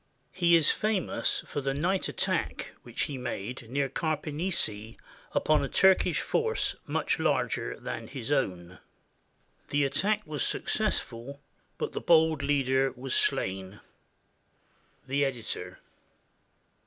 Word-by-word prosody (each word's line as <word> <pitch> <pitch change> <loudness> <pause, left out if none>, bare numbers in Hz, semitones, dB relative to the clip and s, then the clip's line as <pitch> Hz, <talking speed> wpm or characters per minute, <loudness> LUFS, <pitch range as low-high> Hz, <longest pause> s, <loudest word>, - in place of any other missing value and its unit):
He 170 -2 +4
is 165 -3 +5
famous 210 -4 0
for 145 - -3
the 135 0 -1
night 180 +6 +1
attack - - -1
which - - -3
he 140 -3 -3
made 120 0 -5
near 140 +2 +1
Carpenisi 150 - -2 0.3
upon 155 -2 +2
a 135 - -2
Turkish 190 -1 +4
force 455 0 0
much - - 0
larger - - 0
than - - -5
his 130 -1 -5
own. 90 - -1 0.9
The 145 0 +2
attack 205 +10 +1
was 150 -5 -2
successful, 125 +5 -2 0.4
but - - -2
the - - -4
bold 160 -3 +4
leader 135 -1 +2
was 130 0 -5
slain. 95 +1 0 1.3
The 140 +2 +1
Editor. 115 -9 -3
140 Hz, 115 wpm, -29 LUFS, 125-160 Hz, 1.3 s, is